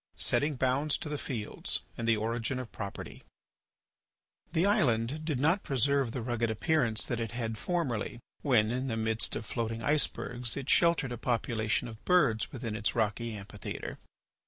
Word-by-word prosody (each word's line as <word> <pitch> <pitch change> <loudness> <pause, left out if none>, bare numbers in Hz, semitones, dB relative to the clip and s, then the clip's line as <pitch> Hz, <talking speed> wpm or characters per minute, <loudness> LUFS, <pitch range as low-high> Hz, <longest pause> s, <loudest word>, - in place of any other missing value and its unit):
III. - - -41
SETTING 145 +5 +3
BOUNDS 135 +3 +1
TO 150 - -5
THE 150 - -2
FIELDS 110 -6 -3
AND 115 - -3
THE 115 -1 +4
ORIGIN 115 +3 -1
OF 125 -3 -5
PROPERTY 100 -2 -6 1.3
The 165 +2 +2
island 140 - +2
did 150 -6 0
not 165 +8 +3
preserve 135 -1 +2
the 120 -1 -3
rugged 120 -1 0
appearance 120 -1 +1
that 120 - -2
it 115 -1 -3
had 115 -2 -2
formerly, 125 - -1 0.2
when, 115 -6 +3
in 130 +2 -1
the 115 -3 -1
midst 110 0 +1
of - - -4
floating 115 0 -3
icebergs 125 -5 0
it 140 - 0
sheltered 170 -6 +4
a 120 - -4
population 115 -1 0
of 110 -1 -10
birds 115 - +3
within 115 -4 -4
its 110 0 0
rocky 110 0 0
amphitheatre. 100 -1 -6
120 Hz, 165 wpm, -31 LUFS, 110-140 Hz, 1.3 s, THE